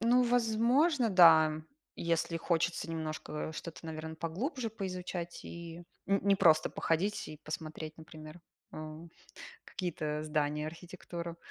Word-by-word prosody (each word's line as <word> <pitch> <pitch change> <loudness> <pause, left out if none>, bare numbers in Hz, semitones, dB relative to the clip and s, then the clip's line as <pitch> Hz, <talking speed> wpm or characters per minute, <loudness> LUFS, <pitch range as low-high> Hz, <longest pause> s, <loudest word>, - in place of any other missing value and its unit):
Ну, 240 +2 +5
возможно, 245 +3 +3
да, 160 -4 +7 0.3
если 165 0 0
хочется 170 0 0
немножко 155 -1 -4
что-то, 165 +1 -7
наверно, 160 0 -5
поглубже 225 - -3
поизучать 180 -4 -5
и 170 0 -8 0.2
н 195 0 +3
не 200 0 +5
просто 155 -4 +5
походить 190 +6 0
и 155 - -9
посмотреть, 155 0 -6
например, 155 +1 -11 0.3
э, 155 0 -6 0.7
какие-то 155 -5 -3
здания, 150 0 0
архитектуру. 170 0 -7
165 Hz, 115 wpm, -32 LUFS, 155-195 Hz, 0.7 s, да